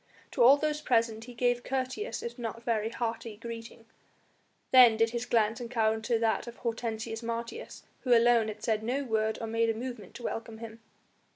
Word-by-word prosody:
To 255 Hz, -, -1 dB
all 260 Hz, +4 st, +8 dB
those 300 Hz, 0 st, -1 dB
present 230 Hz, -4 st, +1 dB
he 245 Hz, -1 st, -11 dB
gave 245 Hz, 0 st, +1 dB
courteous 265 Hz, -, -3 dB
if 470 Hz, -, -6 dB
not 230 Hz, 0 st, -5 dB
very 225 Hz, -2 st, 0 dB
hearty 230 Hz, -2 st, -4 dB
greeting. 230 Hz, 0 st, -8 dB, 0.9 s
Then 245 Hz, -4 st, +8 dB
did 225 Hz, 0 st, +2 dB
his 240 Hz, +1 st, -3 dB
glance 225 Hz, 0 st, +2 dB
encounter 225 Hz, -1 st, 0 dB
that 225 Hz, +1 st, 0 dB
of 235 Hz, -, -8 dB
Hortensius 225 Hz, -1 st, -3 dB
Martius 235 Hz, -, -5 dB, 0.2 s
who 245 Hz, -2 st, +4 dB
alone 235 Hz, -1 st, +4 dB
had 215 Hz, 0 st, -7 dB
said 220 Hz, -2 st, +1 dB
no 255 Hz, +6 st, -1 dB
word 220 Hz, -3 st, 0 dB
or 230 Hz, -, -4 dB
made 230 Hz, +1 st, +1 dB
a 225 Hz, -, 0 dB
movement 240 Hz, -4 st, -7 dB
to 245 Hz, -, -9 dB
welcome 225 Hz, -1 st, -4 dB
him. 225 Hz, 0 st, -9 dB
230 Hz, 180 wpm, -30 LUFS, 225-245 Hz, 0.9 s, all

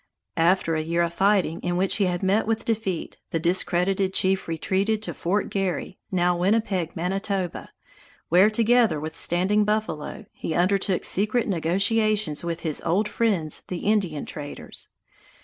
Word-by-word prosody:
After 170 Hz, 0 st, +2 dB
a 155 Hz, -, 0 dB
year 170 Hz, +2 st, 0 dB
of 170 Hz, 0 st, -2 dB
fighting 195 Hz, -4 st, +2 dB
in 175 Hz, 0 st, -2 dB
which 190 Hz, +1 st, +1 dB
he 200 Hz, -, +2 dB
had 180 Hz, 0 st, -2 dB
met 195 Hz, +4 st, +2 dB
with 225 Hz, 0 st, -1 dB
defeat, 210 Hz, -6 st, -2 dB
the 165 Hz, -, -1 dB
discredited 185 Hz, +2 st, +1 dB
chief 190 Hz, 0 st, +2 dB
retreated 195 Hz, +6 st, -1 dB
to -, -, -2 dB
Fort 195 Hz, +5 st, -1 dB
Garry, 190 Hz, -1 st, -2 dB
now 180 Hz, -1 st, +2 dB
Winnipeg, 185 Hz, -2 st, 0 dB
Manitoba, 190 Hz, +1 st, -2 dB, 0.6 s
where, 185 Hz, +5 st, +5 dB
together 230 Hz, -5 st, +3 dB
with 160 Hz, +2 st, -6 dB
Standing 190 Hz, +6 st, +2 dB
Buffalo, 210 Hz, -3 st, -2 dB
he 160 Hz, -, -4 dB
undertook 190 Hz, +1 st, +2 dB
secret 215 Hz, +5 st, +1 dB
negotiations 200 Hz, 0 st, +1 dB
with 170 Hz, 0 st, -3 dB
his 155 Hz, -3 st, -2 dB
old 200 Hz, +6 st, +1 dB
friends 205 Hz, -8 st, 0 dB
the 180 Hz, -, -5 dB
Indian 195 Hz, -8 st, 0 dB
traders. 145 Hz, -1 st, -8 dB
190 Hz, 150 wpm, -24 LUFS, 170-210 Hz, 0.6 s, where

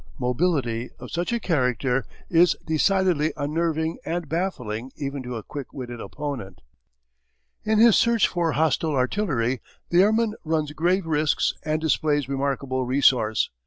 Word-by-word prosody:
Mobility 125 Hz, -4 st, 0 dB
of -, -, -10 dB
such 175 Hz, +5 st, -2 dB
a 235 Hz, -, 0 dB
character 130 Hz, -, 0 dB, 0.2 s
is 175 Hz, +1 st, +4 dB
decidedly 160 Hz, -1 st, +2 dB
unnerving 160 Hz, +2 st, -1 dB
and 170 Hz, -1 st, -3 dB
baffling 135 Hz, -, -3 dB
even 140 Hz, -1 st, -4 dB
to 125 Hz, -1 st, -6 dB
a 110 Hz, -, -5 dB
quick 140 Hz, +3 st, -7 dB
witted 120 Hz, -3 st, -6 dB
opponent. 135 Hz, -11 st, -6 dB, 1.0 s
In 215 Hz, 0 st, +2 dB
his 225 Hz, 0 st, +7 dB
search 235 Hz, -1 st, +4 dB
for 170 Hz, -3 st, -1 dB
hostile 155 Hz, 0 st, +1 dB
artillery 130 Hz, -, 0 dB, 0.3 s
the 175 Hz, +1 st, +6 dB
airman 220 Hz, +2 st, +3 dB
runs 155 Hz, -2 st, -1 dB
grave 175 Hz, +5 st, +1 dB
risks 155 Hz, -2 st, +1 dB
and 155 Hz, 0 st, 0 dB
displays 150 Hz, -3 st, +1 dB
remarkable 135 Hz, -1 st, -1 dB
resource. 125 Hz, -4 st, +2 dB
150 Hz, 135 wpm, -24 LUFS, 130-170 Hz, 1.0 s, his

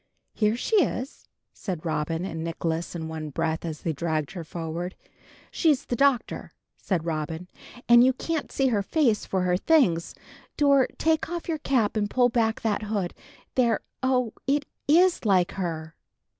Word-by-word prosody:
"Here 215 Hz, 0 st, +2 dB
she 435 Hz, -, +1 dB
is," 270 Hz, -7 st, -1 dB, 0.3 s
said 180 Hz, -5 st, -5 dB
Robin 160 Hz, +2 st, -1 dB
and 160 Hz, -4 st, -4 dB
Nicholas 165 Hz, 0 st, -3 dB
in 160 Hz, -2 st, -4 dB
one 160 Hz, -1 st, -5 dB
breath, 160 Hz, +2 st, -2 dB
as 160 Hz, -2 st, -5 dB
they 165 Hz, -, -1 dB
dragged 155 Hz, -1 st, -2 dB
her 180 Hz, -3 st, -6 dB
forward. 170 Hz, +2 st, -5 dB, 0.6 s
"She's 295 Hz, -5 st, +2 dB
the 245 Hz, -, -2 dB
Doctor," 275 Hz, -1 st, +1 dB, 0.2 s
said 175 Hz, -5 st, -2 dB
Robin, 160 Hz, +1 st, -3 dB, 0.4 s
"and 240 Hz, 0 st, +8 dB
you 260 Hz, -, +5 dB
can't 315 Hz, +4 st, -3 dB
see 270 Hz, -1 st, +2 dB
her 215 Hz, -4 st, +1 dB
face 235 Hz, 0 st, +1 dB
for 190 Hz, -1 st, 0 dB
her 180 Hz, 0 st, +2 dB
things. 185 Hz, -, +2 dB, 0.4 s
Dor, 280 Hz, -3 st, +5 dB
take 320 Hz, 0 st, +1 dB
off 345 Hz, -1 st, -4 dB
your 320 Hz, -2 st, -1 dB
cap 245 Hz, -8 st, +1 dB
and 205 Hz, -1 st, 0 dB
pull 245 Hz, +1 st, +3 dB
back 225 Hz, -2 st, +1 dB
that 215 Hz, -3 st, 0 dB
hood. 205 Hz, -4 st, -2 dB, 0.4 s
There! 235 Hz, -4 st, +2 dB, 0.2 s
Oh, 255 Hz, -3 st, +1 dB
it 285 Hz, +1 st, +2 dB, 0.2 s
is 350 Hz, +4 st, +4 dB
like 190 Hz, -5 st, +3 dB
her!" 165 Hz, -4 st, -4 dB
205 Hz, 165 wpm, -26 LUFS, 165-260 Hz, 0.6 s, and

